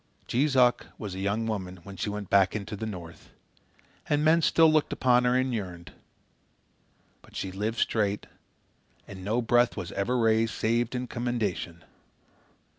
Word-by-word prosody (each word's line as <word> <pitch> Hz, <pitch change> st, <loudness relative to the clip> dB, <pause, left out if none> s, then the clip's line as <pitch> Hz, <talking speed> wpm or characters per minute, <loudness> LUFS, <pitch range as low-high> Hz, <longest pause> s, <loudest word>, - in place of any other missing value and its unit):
Jees 135 Hz, +3 st, +1 dB
Uck 125 Hz, -1 st, +4 dB
was 105 Hz, -4 st, -6 dB
a 95 Hz, -, -6 dB
young 100 Hz, +4 st, -1 dB
woman 95 Hz, -5 st, -4 dB
when 100 Hz, +1 st, -10 dB
she 105 Hz, -, -3 dB
went 105 Hz, -2 st, -6 dB
back 100 Hz, 0 st, +4 dB
into 105 Hz, +1 st, -4 dB
the 110 Hz, +2 st, -5 dB
North, 85 Hz, -5 st, -9 dB, 0.8 s
and 150 Hz, +1 st, +2 dB
men 165 Hz, +2 st, +5 dB
still 160 Hz, 0 st, +5 dB
looked 155 Hz, -1 st, +2 dB
upon 125 Hz, -1 st, +3 dB
her 125 Hz, 0 st, +3 dB
and 130 Hz, 0 st, 0 dB
yearned. 90 Hz, -7 st, -5 dB, 1.3 s
But -, -, -19 dB
she 95 Hz, -, -3 dB
lived 105 Hz, +4 st, -3 dB
straight, 105 Hz, -3 st, 0 dB, 0.8 s
and 95 Hz, -1 st, -9 dB
no 110 Hz, +5 st, 0 dB
breath 120 Hz, +1 st, +3 dB
was 90 Hz, -3 st, -5 dB
ever 110 Hz, +6 st, -1 dB
raised 115 Hz, -1 st, +2 dB
save 120 Hz, +2 st, 0 dB
in 125 Hz, 0 st, -2 dB
commendation. 115 Hz, -9 st, -3 dB
110 Hz, 160 wpm, -27 LUFS, 100-125 Hz, 1.3 s, men